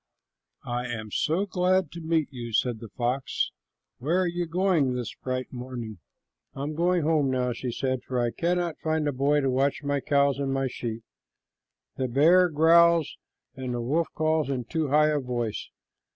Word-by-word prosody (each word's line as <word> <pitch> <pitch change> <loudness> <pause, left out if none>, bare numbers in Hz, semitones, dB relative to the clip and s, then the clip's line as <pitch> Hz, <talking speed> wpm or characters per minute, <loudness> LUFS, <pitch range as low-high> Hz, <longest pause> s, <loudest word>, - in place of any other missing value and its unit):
"I 120 +1 -2
am 110 -3 -5
so 165 - +1
glad 185 -3 +1
to 170 - -8
meet 160 -2 +1
you," 120 -3 -7
said 120 +1 +1
the 115 - -8
fox. 125 +4 -1 0.5
"Where 160 +8 +1
are - - +1
you 175 0 -2
going 165 -7 +1
this 120 -3 -4
bright 130 0 -4
morning?" 120 -5 -6 0.6
"I 135 - -4
am 150 +2 -3
going 175 +1 +1
home 150 -3 +2
now," 125 -1 0
she 120 +1 -4
said, 130 +1 -2
"for 125 -1 -3
I 120 -1 +1
cannot 175 +1 -1
find 155 -1 0
a - - +1
boy 145 +3 +2
to 135 - +1
watch 135 +3 0
my 145 0 0
cows 140 -1 +2
and 140 -1 -1
my 135 0 0
sheep. 115 -3 -4 0.9
The 130 - 0
bear 165 +8 +5
growls 165 +1 +4 0.4
and 130 -2 -4
the 120 - -2
wolf 155 +8 0
calls 155 -2 +1
in 130 -3 -1
too 160 +3 -1
high 150 +2 +4
a 150 -1 +1
voice. 120 -4 -3
140 Hz, 180 wpm, -26 LUFS, 125-160 Hz, 0.9 s, bear